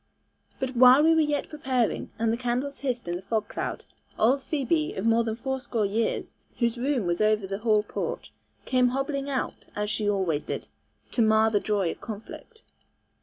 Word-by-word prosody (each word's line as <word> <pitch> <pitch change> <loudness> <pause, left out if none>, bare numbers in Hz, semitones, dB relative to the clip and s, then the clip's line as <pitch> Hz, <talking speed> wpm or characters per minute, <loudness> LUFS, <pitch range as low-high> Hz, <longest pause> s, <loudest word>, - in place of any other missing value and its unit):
But 260 -1 -3
while 255 +4 +8
we 325 +1 +6
were 320 - +4
yet 295 -2 0
preparing, 260 -6 -1
and 225 0 +1
the - - -1
candles 250 +3 -2
hissed 250 -6 -3
in 175 0 -1
the - - -9
fog 215 +1 -1
cloud, - - -4 0.3
old 255 +6 +3
Phoebe, 305 +2 -1
of 190 - -3
more 230 +1 +4
than 220 -1 -2
fourscore 255 -3 -2
years, 220 +3 -1 0.2
whose 235 0 0
room 260 -4 0
was 175 +2 0
over 215 -1 +3
the 195 +1 -4
hall 215 -2 +3
porch, - - -5 0.3
came 255 -1 +3
hobbling 275 +2 -2
out, 265 -2 -3
as 210 0 -1
she 210 -1 0
always 185 -7 0
did, - - -5 0.4
to 240 - +1
mar 220 0 +4
the 205 - +3
joy 200 -5 0
of - - -8
the - - -13
conflict. 225 - -9
235 Hz, 190 wpm, -27 LUFS, 215-265 Hz, 0.4 s, while